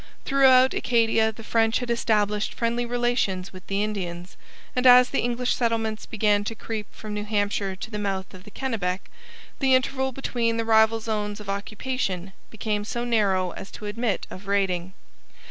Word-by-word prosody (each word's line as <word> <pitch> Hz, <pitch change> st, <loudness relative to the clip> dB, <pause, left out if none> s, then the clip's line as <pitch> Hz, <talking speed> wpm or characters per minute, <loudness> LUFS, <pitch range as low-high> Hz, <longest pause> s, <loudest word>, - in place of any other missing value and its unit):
Throughout 265 Hz, -2 st, +5 dB
Acadia 225 Hz, -2 st, +2 dB
the 225 Hz, +1 st, -12 dB
French 225 Hz, 0 st, +2 dB
had 245 Hz, -1 st, -3 dB
established 210 Hz, -3 st, +1 dB
friendly 235 Hz, +1 st, -1 dB
relations 240 Hz, -7 st, 0 dB
with 185 Hz, -1 st, -12 dB
the 200 Hz, +1 st, 0 dB
Indians, 180 Hz, -4 st, -4 dB, 0.4 s
and 250 Hz, 0 st, +3 dB
as 250 Hz, 0 st, +8 dB
the 275 Hz, -, 0 dB
English 245 Hz, +1 st, 0 dB
settlements 225 Hz, -2 st, -1 dB
began 210 Hz, -2 st, +2 dB
to 225 Hz, -, -4 dB
creep 220 Hz, -1 st, -5 dB
from 215 Hz, -1 st, -8 dB
New 210 Hz, 0 st, -3 dB
Hampshire 205 Hz, -2 st, -1 dB
to 220 Hz, +4 st, -8 dB
the 210 Hz, -, -3 dB
mouth 195 Hz, -2 st, -3 dB
of 185 Hz, -1 st, -12 dB
the -, -, -12 dB
Kennebec, 200 Hz, -7 st, -3 dB, 0.5 s
the 265 Hz, -2 st, +4 dB
interval 265 Hz, +1 st, 0 dB
between 235 Hz, -3 st, -1 dB
the 230 Hz, -, -1 dB
rival 220 Hz, 0 st, +4 dB
zones 210 Hz, -2 st, -3 dB
of 210 Hz, -2 st, -9 dB
occupation 200 Hz, -2 st, -3 dB, 0.2 s
became 210 Hz, -1 st, -2 dB
so 235 Hz, +3 st, -3 dB
narrow 195 Hz, -6 st, +2 dB
as 195 Hz, -, -9 dB
to 210 Hz, -, -8 dB
admit 215 Hz, +1 st, -1 dB
of 195 Hz, +2 st, -10 dB
raiding. 190 Hz, -2 st, 0 dB
220 Hz, 170 wpm, -25 LUFS, 200-235 Hz, 0.5 s, as